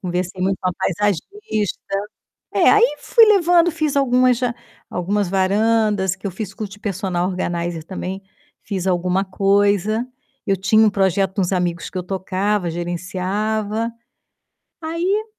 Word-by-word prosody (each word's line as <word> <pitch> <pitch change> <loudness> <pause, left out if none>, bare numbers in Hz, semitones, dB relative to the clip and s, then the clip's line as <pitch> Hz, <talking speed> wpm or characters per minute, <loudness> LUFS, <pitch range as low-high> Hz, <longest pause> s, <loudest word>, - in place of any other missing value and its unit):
Conversei 180 0 -3
muito 190 0 0
com 185 - 0
a - - -1
paisagista. 210 - -2 0.7
É, - - +4
aí 425 -7 +4
fui 465 - +5
levando, 350 -4 +4
fiz 310 -3 -1
algumas 255 -2 +3
já 245 -2 -1 0.4
algumas 195 +2 -1
varandas 200 0 +2
que 190 +1 -7
eu - - -1
fiz 195 +2 -6
curso 205 -2 -6
de 205 - -12
personal 185 -3 -1
organizer 175 -3 -3
também, 190 +2 -5 0.4
fiz 190 -2 -4
alguma 180 +1 +1
coisa. 200 +3 +1 0.4
Eu 195 - +2
tinha 195 +4 +4
um - - +4
projeto 195 -1 +1
com - - +1
uns 180 - -1
amigos 175 -2 -1
que - - -11
eu - - -2
tocava, 190 0 -1
gerenciava. 200 +6 -2 0.9
Aí 350 +7 -1
195 Hz, 145 wpm, -20 LUFS, 185-220 Hz, 0.9 s, fui